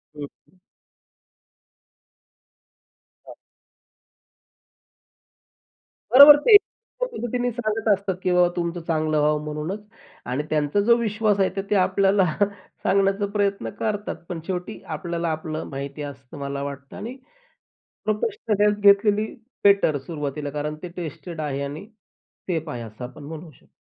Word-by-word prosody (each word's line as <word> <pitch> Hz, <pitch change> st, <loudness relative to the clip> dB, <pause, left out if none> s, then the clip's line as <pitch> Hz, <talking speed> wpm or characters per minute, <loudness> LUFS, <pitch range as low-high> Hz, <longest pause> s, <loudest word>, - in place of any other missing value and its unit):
हं, 145 Hz, -, -7 dB
हं. 185 Hz, +5 st, -14 dB, 2.7 s
हां. -, -, -9 dB, 2.8 s
बरोबर, 285 Hz, +3 st, +11 dB
ते 430 Hz, +9 st, +4 dB
एका 460 Hz, +4 st, +3 dB
पद्धतीने 245 Hz, -, -2 dB
सांगत 225 Hz, -1 st, -3 dB
असतात 195 Hz, -1 st, -2 dB
की 185 Hz, -, +1 dB
बाबा 180 Hz, 0 st, +5 dB
तुमचं 170 Hz, 0 st, -2 dB
चांगलं 155 Hz, -2 st, +1 dB
व्हावं 150 Hz, 0 st, +2 dB
म्हणूनच 155 Hz, +7 st, -4 dB, 0.4 s
आणि 130 Hz, +4 st, -2 dB
त्यांचा 150 Hz, +5 st, +1 dB
जो 235 Hz, +3 st, +5 dB
विश्वास 215 Hz, -2 st, 0 dB
आहे, 190 Hz, -, +3 dB
तर 195 Hz, -, -1 dB
ते 210 Hz, -, +2 dB
आपल्याला 195 Hz, 0 st, +3 dB, 0.6 s
सांगण्याचा 195 Hz, +1 st, +2 dB
प्रयत्न 200 Hz, -1 st, 0 dB
करतात. 210 Hz, -1 st, -2 dB
पण 175 Hz, -, -4 dB
शेवटी 185 Hz, +3 st, -4 dB, 0.2 s
आपल्याला 170 Hz, -1 st, -3 dB
आपलं 155 Hz, 0 st, -4 dB
माहिती 140 Hz, +1 st, -6 dB
असतं 140 Hz, -1 st, -9 dB
मला 140 Hz, 0 st, -4 dB
वाटतं 140 Hz, -1 st, -7 dB
आणि 230 Hz, +5 st, -6 dB, 0.9 s
प्रोफेशनल 215 Hz, -, -1 dB
हेल्प 210 Hz, 0 st, +3 dB
घेतलेली 205 Hz, +1 st, +5 dB, 0.4 s
बेटर 200 Hz, -7 st, +4 dB
सुरुवातीला 145 Hz, 0 st, -5 dB
कारण 150 Hz, +1 st, -3 dB
ते -, -, -4 dB
टेस्टेड 165 Hz, 0 st, -6 dB
आहे 140 Hz, -2 st, -3 dB
आणि 145 Hz, +8 st, -6 dB, 0.6 s
सेफ 160 Hz, -2 st, -2 dB
आहे 120 Hz, -4 st, -5 dB
असं 110 Hz, +2 st, -10 dB
आपण 135 Hz, +4 st, -9 dB
म्हणू 160 Hz, +2 st, -8 dB
शकतो. 130 Hz, -, -25 dB
180 Hz, 130 wpm, -24 LUFS, 150-205 Hz, 2.8 s, बरोबर